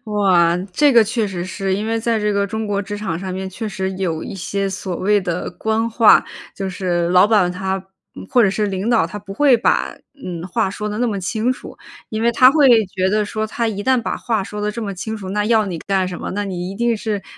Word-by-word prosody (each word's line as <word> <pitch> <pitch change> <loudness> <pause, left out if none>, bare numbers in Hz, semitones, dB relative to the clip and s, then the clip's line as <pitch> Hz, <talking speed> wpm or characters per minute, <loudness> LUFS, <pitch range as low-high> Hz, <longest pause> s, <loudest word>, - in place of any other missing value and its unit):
哇， 185 -6 +3 0.2
这 290 +7 +4
个 235 -2 +7
确 225 +1 -1
实 180 -3 -4
是， 190 0 -2
因 210 +2 -2
为 225 0 0
在 225 0 0
这 210 0 0
个 200 0 +1
中 220 +2 -4
国 200 -1 -1
职 205 +1 -6
场 190 -6 -3
上 190 0 -5
面 190 +1 -4
确 210 +4 -5
实 190 -1 -3
有 180 -4 -2
一 - - -6
些 195 +1 -2
所 185 -1 -4
谓 205 +2 +2
的 180 -2 -3
官 220 +5 -1
话， 225 -1 +5 0.3
就 195 -1 -4
是 175 -2 -1
老 180 +2 +5
板 205 -5 +3
他 190 +1 -2 0.4
嗯， - - -9
或 245 - +5
者 205 - +4
是 210 +2 -1
领 195 +2 -2
导， 230 -8 +3
他 210 +5 -7
不 195 0 -9
会 270 +1 +5
把， 230 - +1 0.3
嗯， 175 -1 -5
话 220 +1 0
说 210 +2 -4
得 210 0 -4
那 245 - +1
么 205 -3 -2
清 220 +6 0
楚。 255 - -11 0.3
因 220 0 -3
为 235 +1 +3
他 255 +2 +7
会 265 -7 +5
觉 185 0 -1
得 210 +1 +1
说 215 +1 -3
他 230 +1 -2
一 205 -2 -4
旦 260 +2 +2
把 - - -3
话 225 -4 -1
说 210 +2 -6
得 210 0 -1
这 230 +2 -5
么 200 -2 -4
清 220 +4 -5
楚， 195 -3 -8
那 210 +1 0
要 220 -1 +3
你 175 -4 -4
干 190 -2 0
什 180 -2 -6
么？ - - -5
那 205 +1 -2
你 180 -2 -4
一 195 - -7
定 235 +1 +1
是， 210 -2 -3
205 Hz, 275 characters per minute, -19 LUFS, 190-220 Hz, 0.4 s, 个